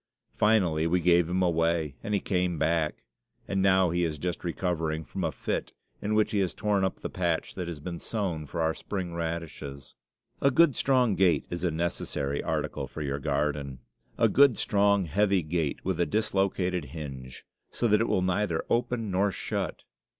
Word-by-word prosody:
Finally 90 -8 +3
we 90 +2 +2
gave 85 -1 +4
him 95 +1 +1
away, 85 -3 +1
and 105 - -1
he - - +2
came 90 -3 0
back; 80 0 0 0.4
and 95 -1 0
now 95 -2 +4
he 90 +1 +1
is 80 -2 -1
just 90 +3 -3
recovering 80 -3 -1
from 70 - -5
a - - 0
fit, - - -3 0.3
in 105 +1 0
which 110 0 +2
he 105 - +1
has 95 -3 0
torn 105 -2 +1
up 95 - 0
the - - -3
patch 85 -3 -1
that 90 -2 -4
has 85 -3 -5
been 85 +3 -6
sown 90 -9 -3
for 85 - -3
our 80 0 +2
spring 90 -2 -5
radishes. 80 -4 -5 0.5
A 140 - +5
good, 145 0 +4
strong 125 -4 +3
gate 95 -3 +3
is 85 0 -4
a 90 - +2
necessary 75 -4 -2
article - - -2
for 75 - -6
your 70 0 -2
garden. 70 -1 -1 0.4
A - - +5
good, 140 -3 +5
strong, 100 -1 +2
heavy 95 +2 +2
gate, 80 -2 -2
with 95 -2 -1
a 85 - +2
dislocated 95 -3 0
hinge, 65 -3 -8 0.2
so 120 - 0
that 105 0 +4
it 115 - +1
will 90 - +1
neither 90 -2 0
open 120 -3 0
nor 100 +2 +2
shut. - - -3
90 Hz, 185 wpm, -28 LUFS, 80-100 Hz, 0.5 s, A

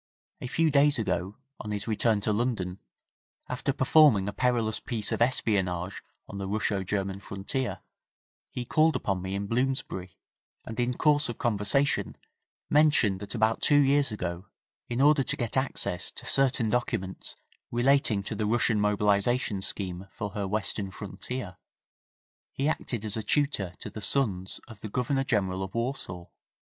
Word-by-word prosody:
A - - -4
few 160 +4 +2
days 145 0 +4
ago, 100 -3 -2 0.2
on 105 - -6
his 105 +1 -3
return 110 -1 +2
to 105 - +1
London, 105 -5 -1 0.7
after 125 +2 -1
performing 130 -7 +5
a 100 - -3
perilous 120 -4 +1
piece 110 -3 -3
of - - -1
espionage 95 -7 0 0.3
on 100 - -7
the 95 - -3
Russo 100 -1 0
German 95 0 -2
frontier, 100 +7 -3 0.7
he 125 - -5
called 155 +5 +3
upon 95 -2 -1
me 95 +1 -4
in 100 +1 -2
Bloomsbury, 115 -6 -2 0.5
and 110 +2 -6
in 120 0 0
course 145 -2 +3
of 120 - -5
conversation, 115 +5 +1 0.5
mentioned 145 -10 +4
that 100 +4 -6
about 110 0 +1
two 145 - +5
years 140 -1 +4
ago, 90 -2 -4 0.4
in 120 +2 -1
order 145 0 +5
to 140 +2 0
get 120 -3 -3
access 130 -9 0
to - - -11
certain 130 -5 +2
documents 95 -6 -2 0.3
relating 120 -4 +2
to 100 - -4
the 105 0 -1
Russian 115 -1 +2
mobilisation 105 +1 +1
scheme 95 -1 -3
for 105 -1 -5
her 100 -1 -3
western 100 0 +1
frontier, 100 0 -6 0.9
he 140 - -1
acted 120 -7 -2
as 110 +1 -3
tutor 140 -11 0
to - - -8
the 110 - -7
sons 100 -8 +1
of 110 -4 -13
the 110 - -6
Governor 130 +5 0
General 95 -7 0
of 95 +2 -5
Warsaw. 115 -8 -3
110 Hz, 155 wpm, -28 LUFS, 100-130 Hz, 0.9 s, performing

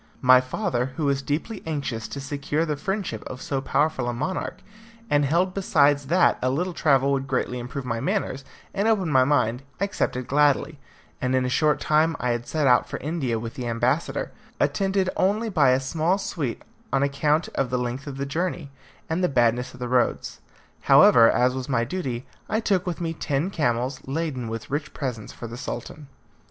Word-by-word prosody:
My 130 0 +7
father, 130 - -1
who 155 - -1
was 140 -1 +1
deeply 160 +10 -3
anxious 135 -8 -3
to 140 - -6
secure 145 +3 -2
the 150 -2 -1
friendship 185 - -3
of 125 - -7
so 135 0 -2
powerful 135 -3 0
a - - -2
monarch, 180 +10 -3 0.5
and 145 0 +4
held 175 +6 +1
besides 145 -7 +2
that 175 +4 +3
a 130 - +1
little 175 +7 -1
travel 140 -4 +3
would 135 -1 -1
greatly 125 -1 -1
improve 125 +2 -6
my 115 -2 -2
manners 135 +1 -2 0.3
and 200 +2 0
open 195 -8 +2
my 130 -2 +5
mind, 125 -4 +1 0.2
accepted 185 -10 -1
gladly, 145 +2 +2 0.4
and 130 0 +1
in 130 0 +2
a - - 0
short 150 +2 +2
time 155 +2 +2
I 125 - 0
had 120 0 -3
set 155 -2 0
out 125 -2 +4
for - - -4
India 140 -7 -2
with 115 +1 -5
the 125 -4 -5
ambassador, 115 0 0 0.3
attended 190 +6 +1
only 210 +4 +1
by 150 -9 +4
a 130 +1 +4
small 160 +7 0
suite 155 -10 -4 0.3
on 135 +1 +2
account 150 +3 +1
of 135 -2 -1
the 125 - 0
length 125 +4 -3
of 135 -2 -6
the 140 - -2
journey, 165 0 -3 0.4
and 165 +3 -1
the 180 - +3
badness 120 -2 +2
of - - -14
the 125 - -3
roads. 125 0 0 0.4
However, 115 -2 +7
as 125 +1 +3
was 130 0 -5
my 120 -3 +2
duty, 130 -4 -4 0.2
I 220 - +1
took 195 -5 0
with 175 -2 -3
me 165 -1 -2
ten 155 +3 -1
camels, 125 -4 -1
laden 135 -4 -2
with 115 +2 -6
rich 145 +1 -3
presents 125 -6 -4
for - - -9
the 115 +1 -7
Sultan. 140 +5 -6
140 Hz, 190 wpm, -24 LUFS, 125-160 Hz, 0.5 s, My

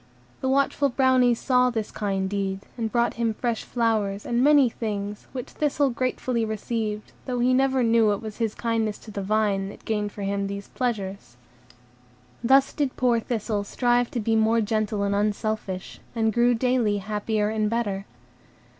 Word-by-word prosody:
The 265 - -1
watchful 275 +1 +2
Brownies 255 -2 +3
saw 250 -1 +3
this 225 -3 -3
kind 195 -2 -1
deed, 195 -1 -2
and 225 -3 -3
brought 235 +1 +2
him 225 -2 +1
fresh 235 -1 -2
flowers, 215 -4 0
and 240 +1 +1
many 290 -2 +6
things, 210 -3 -4
which 250 -2 -6
Thistle 285 -2 +1
gratefully 250 -1 -1
received, 215 0 -3 0.2
though 250 -1 -1
he 245 +1 +3
never 265 0 +3
knew 225 -2 +4
it 205 - -1
was 215 -2 -7
his 225 -3 -1
kindness 225 -2 -1
to 220 - -12
the 200 - -4
vine 200 -1 +1
that - - -13
gained 210 -2 -1
for 205 - -7
him 200 0 -1
these 200 0 -6
pleasures. 200 - -3 1.1
Thus 270 +3 +4
did 285 -4 -1
poor 245 -2 +3
Thistle 220 -3 -2
strive 240 +3 +1
to 240 - -3
be 225 +1 +1
more 220 +1 +3
gentle 215 -1 0
and 200 0 0
unselfish, 205 -2 -2 0.2
and 220 -1 +1
grew 240 +1 +4
daily 235 -3 +1
happier 210 +1 -1
and 215 -1 0
better. 205 -4 -1
225 Hz, 170 wpm, -25 LUFS, 205-245 Hz, 1.1 s, many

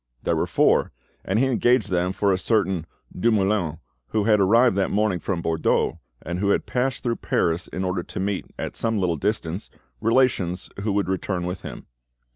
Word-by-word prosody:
There - - +1
were - - 0
four, - - +3 0.3
and 95 - 0
he 130 - +4
engaged 120 -4 +2
them 90 0 +1
for 100 +1 +1
a - - +1
certain 95 -6 0 0.3
Dumoulin, 95 -5 +1 0.3
who 110 -1 0
had 105 0 +4
arrived 115 +4 +4
that 95 - +1
morning 105 -3 +1
from 85 -3 -3
Bordeaux, 80 -1 +1 0.2
and 85 +3 -4
who 100 +1 +1
had - - +2
passed 130 +1 -1
through 120 -2 0
Paris 85 +1 0
in 95 - -4
order 90 -1 -1
to - - -7
meet, 95 0 -2
at - - -5
some 115 -1 0
little 90 -4 +1
distance, 90 +1 -2 0.3
relations 115 -7 +1
who 105 +1 -1
would 100 -1 0
return 95 -1 -2
with 90 +1 -4
him. - - -8
95 Hz, 185 wpm, -24 LUFS, 90-110 Hz, 0.3 s, he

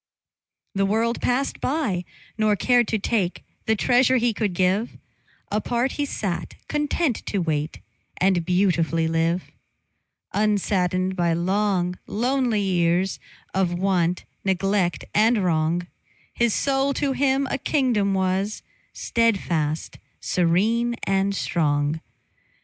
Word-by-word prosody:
The 195 0 +1
world 225 +3 0
passed 260 +3 0
by, 250 - -1 0.3
nor 215 -1 +2
cared 245 +2 +3
to 220 - 0
take 200 -3 -1 0.2
The 220 - +3
treasure 255 +4 +3
he 240 -1 +1
could 205 -4 -2
give; 190 +6 +1 0.5
Apart 240 +5 0
he 290 - -2
sat, 195 -9 -4
content 295 -3 0
to 205 - -1
wait 155 -3 -2 0.4
And 185 -2 +2
beautifully 170 -3 +1
live; 165 +2 0 0.8
Unsaddened 190 -3 +1
by 170 -2 +1
long, 180 0 0
lonely 245 -1 0
years 180 -1 +1 0.3
Of 185 -2 +1
want, 180 -2 0 0.2
neglect, 190 -1 0
and 220 0 +3
wrong, 170 0 +1 0.5
His 235 -2 +1
soul 275 0 +1
to 285 -2 0
him 270 0 +1
a 280 - -1
kingdom 230 -9 +1
was, 190 +2 -1 0.3
Steadfast, 170 -9 0 0.2
serene, 215 +8 +1
and 195 0 +1
strong. 150 -3 0
195 Hz, 115 wpm, -24 LUFS, 175-235 Hz, 0.8 s, cared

